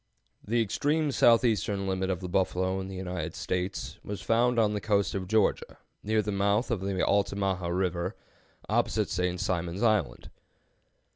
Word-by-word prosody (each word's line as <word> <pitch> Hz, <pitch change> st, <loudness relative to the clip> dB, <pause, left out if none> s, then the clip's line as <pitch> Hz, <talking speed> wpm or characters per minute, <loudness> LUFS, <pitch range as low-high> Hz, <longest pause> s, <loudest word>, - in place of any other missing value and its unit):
The 115 Hz, +2 st, +1 dB
extreme 145 Hz, +8 st, 0 dB
southeastern 110 Hz, -6 st, +3 dB
limit 95 Hz, 0 st, -1 dB
of 95 Hz, -1 st, -2 dB
the 90 Hz, -, -4 dB
buffalo 95 Hz, +1 st, 0 dB
in 95 Hz, -, -5 dB
the 95 Hz, -, -7 dB
United 90 Hz, -3 st, -4 dB
States 90 Hz, +2 st, -3 dB
was 100 Hz, -1 st, -5 dB
found 120 Hz, +1 st, +2 dB
on 110 Hz, -2 st, +3 dB
the 105 Hz, -, -2 dB
coast 100 Hz, -1 st, +1 dB
of 95 Hz, -2 st, -3 dB
Georgia, 110 Hz, 0 st, +1 dB, 0.2 s
near 110 Hz, +1 st, +1 dB
the 105 Hz, -, -2 dB
mouth 100 Hz, +5 st, +1 dB
of 110 Hz, -5 st, -1 dB
the 95 Hz, -1 st, 0 dB
Altamaha 100 Hz, -2 st, 0 dB
River, 90 Hz, +1 st, -1 dB, 0.5 s
opposite -, -, 0 dB
St. 90 Hz, 0 st, -1 dB
Simon's 90 Hz, +3 st, -2 dB
Island. 105 Hz, -9 st, 0 dB
100 Hz, 155 wpm, -28 LUFS, 95-110 Hz, 0.5 s, southeastern